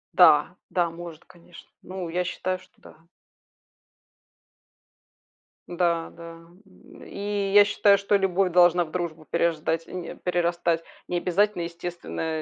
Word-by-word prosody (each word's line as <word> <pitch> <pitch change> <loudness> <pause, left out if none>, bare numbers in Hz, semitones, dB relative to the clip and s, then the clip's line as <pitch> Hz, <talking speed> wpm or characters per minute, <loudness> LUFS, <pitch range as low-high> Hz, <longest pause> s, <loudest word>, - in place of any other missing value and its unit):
Да, - - +6
да, 175 -2 +1
может, 165 -1 -10
конечно. 175 0 -17
Ну, 185 -1 -6
я 175 +2 -1
считаю, 185 +1 -3
что 185 0 -21
да. - - -16 2.7
Да, 170 -2 0
да. 165 0 -12 0.2
М, 195 - -17
и 200 -1 -3
я 205 0 +8
считаю, 205 0 +4
что 200 +1 +1
любовь 195 -1 +1
должна 175 0 +5
в 155 - -14
дружбу 165 -3 -4
переждать, 165 0 -1
э, - - -13
н 180 -1 -5
э, - - -8
перерастать. 170 -1 0 0.2
Не 180 - -1
обязательно, 180 +1 +1
естественная, 170 -2 -5
175 Hz, 135 wpm, -25 LUFS, 170-185 Hz, 2.7 s, я